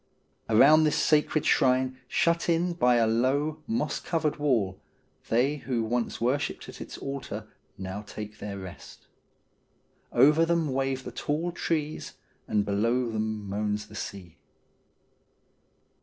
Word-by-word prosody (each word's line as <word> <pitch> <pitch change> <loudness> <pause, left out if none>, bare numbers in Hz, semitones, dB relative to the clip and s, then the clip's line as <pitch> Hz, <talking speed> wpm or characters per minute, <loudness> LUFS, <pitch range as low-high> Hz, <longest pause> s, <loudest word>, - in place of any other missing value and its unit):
Around 145 +8 +7
this 150 - +2
sacred 155 0 +2
shrine, 130 0 +2
shut 170 +1 +1
in 170 +1 +2
by 125 -8 +3
a 115 -1 +4
low, 135 +7 +1
moss 225 +2 -1
covered 160 -3 -1
wall, 115 -11 0 0.5
they 130 +6 +2
who 125 -4 -2
once 120 +1 -1
worshipped 130 +5 -1
at - - -10
its - - -7
altar 140 0 -5 0.3
now 95 +2 -5
take 105 0 -8
their 100 -1 -5
rest. 95 -2 -10 1.1
Over 150 +6 +5
them 165 -4 +1
wave 135 0 -1
the - - -7
tall 160 +4 -2
trees, 155 -3 -2 0.3
and 105 -1 +1
below 115 +4 +1
them 110 -1 -3
moans 105 +1 -2
the - - -13
sea. 90 -4 -7
130 Hz, 130 wpm, -28 LUFS, 110-150 Hz, 1.1 s, Around